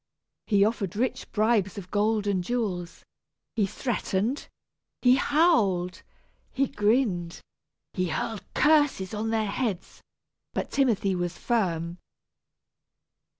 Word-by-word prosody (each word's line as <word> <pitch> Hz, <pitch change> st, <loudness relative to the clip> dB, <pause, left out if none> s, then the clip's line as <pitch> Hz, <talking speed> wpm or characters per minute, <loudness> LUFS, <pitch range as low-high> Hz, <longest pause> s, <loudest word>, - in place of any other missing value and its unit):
He 200 Hz, -2 st, +4 dB
offered 210 Hz, -4 st, -2 dB
rich 250 Hz, +4 st, -2 dB
bribes 215 Hz, -3 st, +1 dB
of 185 Hz, -2 st, -8 dB
gold 210 Hz, 0 st, +1 dB
and 195 Hz, -3 st, 0 dB
jewels, 185 Hz, -6 st, -3 dB, 0.5 s
he 210 Hz, -3 st, +2 dB
threatened, 235 Hz, +2 st, -2 dB, 0.6 s
he 250 Hz, -1 st, +7 dB
howled, 205 Hz, -, +2 dB, 0.5 s
he 275 Hz, +1 st, +1 dB
grinned, 205 Hz, -7 st, 0 dB, 0.5 s
he 185 Hz, 0 st, 0 dB
hurled 215 Hz, +3 st, -3 dB
curses 290 Hz, -11 st, +3 dB
on 215 Hz, +1 st, -2 dB
their 220 Hz, -1 st, +1 dB
heads, 200 Hz, -6 st, -3 dB, 0.5 s
but -, -, -3 dB
Timothy 230 Hz, -8 st, +2 dB
was 175 Hz, -1 st, -2 dB
firm. 175 Hz, -7 st, -1 dB
210 Hz, 110 wpm, -27 LUFS, 185-240 Hz, 0.6 s, he